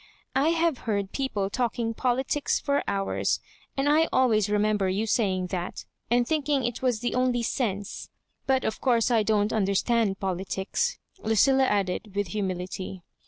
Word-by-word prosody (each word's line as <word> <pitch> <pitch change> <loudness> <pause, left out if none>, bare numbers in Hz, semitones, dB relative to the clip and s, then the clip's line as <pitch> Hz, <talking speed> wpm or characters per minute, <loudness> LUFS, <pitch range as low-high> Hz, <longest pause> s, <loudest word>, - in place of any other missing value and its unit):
I 280 +4 +3
have 330 -4 +1
heard 200 -2 -1
peo 270 -1 -1
ple 200 -6 -2
talking 235 -1 -1
politics 260 +5 0
for 280 0 0
hours, 195 -1 0 0.4
and 275 +1 +1
I 310 +2 +4
always 220 -6 +3
re 210 - +2
member 210 -2 +1
you 200 +4 0
saying 190 -5 0
that, 180 -1 -4 0.2
and 240 0 +3
thinking 295 -3 +1
it 240 0 -3
was 245 -4 +1
the 240 - -1
only 250 -1 +1
sense; 205 -5 -2 0.4
but, 265 -1 +2
of 220 - -2
course, 240 -2 +2
I 230 -2 +4
don't 210 0 +1
understand 200 0 +1
politics," 190 - -2 0.3
LudUa 265 +5 +4
added, 200 0 -1
with 205 -3 -1
humility. 185 -1 -4
220 Hz, 160 wpm, -27 LUFS, 195-260 Hz, 0.4 s, I